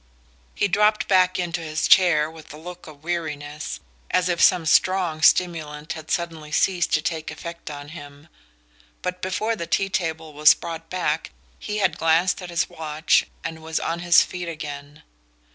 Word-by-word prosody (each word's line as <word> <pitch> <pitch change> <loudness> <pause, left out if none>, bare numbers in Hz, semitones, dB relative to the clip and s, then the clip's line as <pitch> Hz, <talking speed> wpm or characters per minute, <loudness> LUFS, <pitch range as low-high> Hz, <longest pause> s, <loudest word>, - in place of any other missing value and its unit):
He 205 - +1
dropped 210 +2 +2
back 185 -1 +3
into 175 -1 -2
his 155 -1 -1
chair 170 -5 +5
with 160 0 -12
a 150 - -10
look 175 +2 -10
of 150 -1 -14
weariness, 150 -3 -4 0.3
as 180 0 +1
if 175 -1 0
some 170 -3 +5
strong 175 -1 +2
stimulant 155 -3 +2
had 160 -1 -10
suddenly 165 -4 -3
ceased 175 +2 +1
to 155 - -1
take 160 -2 -3
effect 170 -1 -8
on 145 -1 -8
him; 145 -1 -11 0.8
but 180 0 -3
before 215 +5 -1
the 170 -5 -5
tea 195 0 +1
table 160 -4 -3
was 150 +1 +6
brought 165 -1 -7
back 160 -4 -1 0.3
he 210 0 -4
had 190 -6 +1
glanced 165 +4 +2
at 180 - -7
his 170 -1 0
watch 155 0 +1 0.2
and 160 0 -6
was 160 0 -2
on 165 +1 -2
his 175 -1 +6
feet 180 -1 -6
again. 145 -2 -8
165 Hz, 170 wpm, -23 LUFS, 155-180 Hz, 0.8 s, was